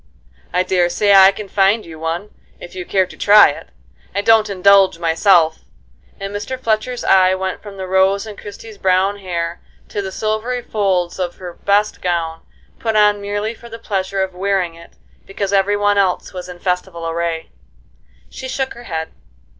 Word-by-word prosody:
"I 180 - +1
daresay 185 +2 +2
I 195 0 +8
can 205 +1 -8
find 200 +3 +2
you 160 -2 -11
one, 165 +6 -4 0.3
if 175 - -11
you 180 -1 -7
care 190 -1 +2
to - - -13
try 210 +1 +7
it. 145 - -8 0.5
I 200 - +1
don't 220 -1 +4
indulge 195 -1 +4
myself." 165 0 +3 0.6
And 195 +1 -5
Mr. 220 +6 -4
Fletcher's 230 +1 -1
eye 185 -1 +4
went 190 0 -4
from 205 -2 -11
the 190 - -5
rose 190 +2 +2
in 215 -2 -8
Christie's 205 +1 -11
brown 190 +2 +1
hair 170 -3 -4 0.3
to 205 - -3
the 190 -1 -5
silvery 220 +4 -2
folds 190 -5 -1
of 175 -1 -2
her 180 -2 -8
best 205 +3 0
gown, 165 -2 -2 0.4
put 225 -2 -1
on 210 -1 +4
merely 205 +2 -3
for 235 +1 -14
the 230 - -8
pleasure 195 -3 -2
of 190 -1 -5
wearing 185 -2 -1
it 170 0 -15 0.3
because 195 0 -3
every 200 +1 +2
one 205 0 +2
else 185 -2 0
was 180 0 -7
in 180 - -9
festival 180 -2 -3
array. 165 0 -3 0.8
She 260 - -8
shook 265 0 -3
her 240 +1 -12
head. 160 -4 -4
195 Hz, 180 wpm, -18 LUFS, 180-205 Hz, 0.8 s, I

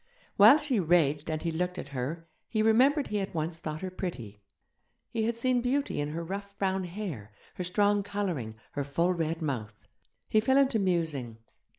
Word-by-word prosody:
While 215 +8 +9
she 290 -7 0
raged 155 -4 +2
and 155 0 -2
he 165 - 0
looked 180 +3 -2
at - - -6
her, 145 +6 -4 0.2
he 215 -2 +1
remembered 265 +7 +4
he 210 - -1
had 195 -3 -3
once 160 +1 -2
thought 155 -1 -5
her 185 -1 -4
pretty. 120 - -6 0.7
He 225 -1 0
had 230 0 -1
seen 250 +1 +2
beauty 260 - 0
in 145 - -2
her 165 +2 -4
rough 200 +2 -6
brown 190 -1 0
hair, 170 - -6 0.2
her 180 - -4
strong 205 +3 +2
colouring, 185 - -3 0.2
her 145 - -2
full 170 +6 +1
red 165 -1 -2
mouth. 110 -8 -4 0.4
He 215 - +3
fell 265 +5 +3
into 270 -4 +3
musing 160 - -1
180 Hz, 185 wpm, -29 LUFS, 155-210 Hz, 0.7 s, While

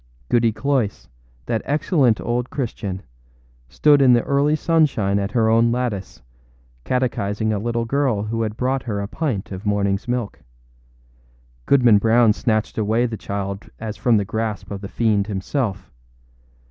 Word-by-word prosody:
Goody 115 -1 +3
Cloyse, 110 - -1 0.4
that 110 - -1
excellent 145 - +2
old 120 +1 -2
Christian, 105 -8 -4 0.7
stood 145 - +4
in 130 -2 +6
the 120 - +3
early 140 +2 +2
sunshine 140 - +1
at 100 0 -3
her 115 -3 +2
own 115 +1 +4
lattice, 120 - -3 0.6
catechizing 110 - -1
a 105 - -1
little 115 +2 -2
girl 125 -4 0
who 115 +2 -2
had 110 0 -3
brought 130 +2 0
her 105 -5 -3
a 100 - -3
pint 120 - -3
of 95 -1 -6
morningâs 100 -1 0
milk. 120 -4 -3 1.3
Goodman 120 -6 +5
Brown 115 +1 +4
snatched 110 0 -1
away 110 +3 +1
the 115 -2 -3
child 100 -1 -5
as 110 -1 -5
from 120 -3 +2
the 100 - 0
grasp 110 0 -4
of 100 -1 -5
the 100 - -7
fiend 105 -4 +1
himself. 100 - -3
115 Hz, 150 wpm, -21 LUFS, 100-125 Hz, 1.3 s, in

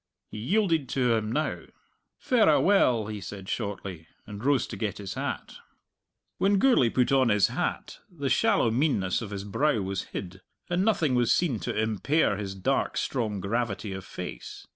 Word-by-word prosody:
He 110 - -6
yielded 165 - +1
to 125 -3 +2
him 110 -1 -1
now. 155 +5 -2 0.5
"Verra 220 - +4
well," 125 - +3
he 105 -1 -6
said 95 0 -8
shortly, 100 -7 -5 0.2
and 105 +1 -8
rose 140 -1 +2
to - - -7
get 100 +1 -3
his 100 -2 -6
hat. - - -5 0.8
When 200 +1 +3
Gourlay 215 - +4
put 125 +2 +1
on 130 -3 +4
his 105 -3 +3
hat - - -3
the 145 -6 -4
shallow 120 -2 +3
meanness 115 - +1
of 110 - -6
his 100 -1 -5
brow 115 +5 +1
was 95 0 -3
hid, 95 0 -7 0.3
and 175 +2 +2
nothing 170 -10 +2
was 120 -2 +2
seen 145 -11 +1
to 90 - -3
impair 110 +4 +1
his 100 -2 -5
dark, 95 - 0
strong 110 -6 -1
gravity 105 0 -2
of 95 0 -6
face. - - -8
115 Hz, 170 wpm, -27 LUFS, 100-145 Hz, 0.8 s, Verra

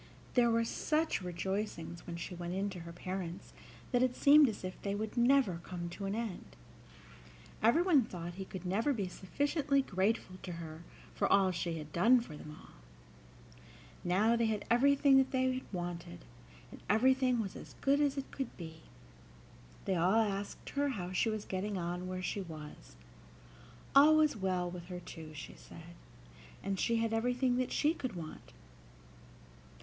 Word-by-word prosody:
There 240 -2 +4
were 230 0 +2
such 310 +2 0
rejoicings 180 -1 -4
when 170 - -4
she 170 +2 -6
went 175 0 -4
in 200 +1 -1
to 185 - -7
her 170 0 -8
parents 180 0 -6 0.4
that 245 -2 +3
it 255 -1 +2
seemed 290 -1 +7
as 210 - -6
if 185 0 -6
they 200 0 -2
would 215 +1 -4
never 240 -7 +3
come 175 -2 -5
to 195 +3 -6
an 195 +1 -1
end. 225 -5 -5 1.1
Everyone 310 - +5
thought 175 -5 -7
that - - -13
he 190 +2 -6
could 185 -1 -8
never 220 +10 +1
be 200 -6 -2
sufficiently 280 - 0
grateful 190 -2 -1
to 180 - -6
her 165 -1 -8 0.3
for - - 0
all 195 -2 +5
she 170 -2 -2
had 150 -1 -8
done 235 +9 +5
for 175 -10 -8
them 150 +1 -10
all. - - -16 1.3
Now 205 +6 +3
they 230 -1 +2
had 215 -2 -2
everything 275 +2 +5
that 265 0 +4
they 260 0 +1
wanted, 175 - -5 0.5
and - - -11
everything 255 +2 +4
was 200 -4 -3
as - - -10
good 280 +1 +3
as 285 -1 +1
it 275 - -4
could 270 -3 -5
be. 160 -2 -9 1.0
They 190 - +1
all 180 +5 +3
asked 205 -3 -1
her 285 0 +1
how 185 -8 -4
she 185 +5 +1
was 215 -1 -3
getting 195 +2 -2
on 175 +1 -3
where 185 0 -4
she 200 - -2
was. 155 -4 -10 1.0
All 300 +3 +8
was 305 -2 +4
well 185 -3 -1
with 175 -1 -7
her 180 0 -6
too, 160 -3 -10
she 145 - -8
said; 170 +1 -13 0.7
and 195 -1 -2
she 235 - +2
had 225 0 0
everything 245 +2 +1
that 255 0 -1
she 305 +2 +2
could 255 - -5
want. 160 -3 -8
200 Hz, 175 wpm, -33 LUFS, 175-250 Hz, 1.3 s, All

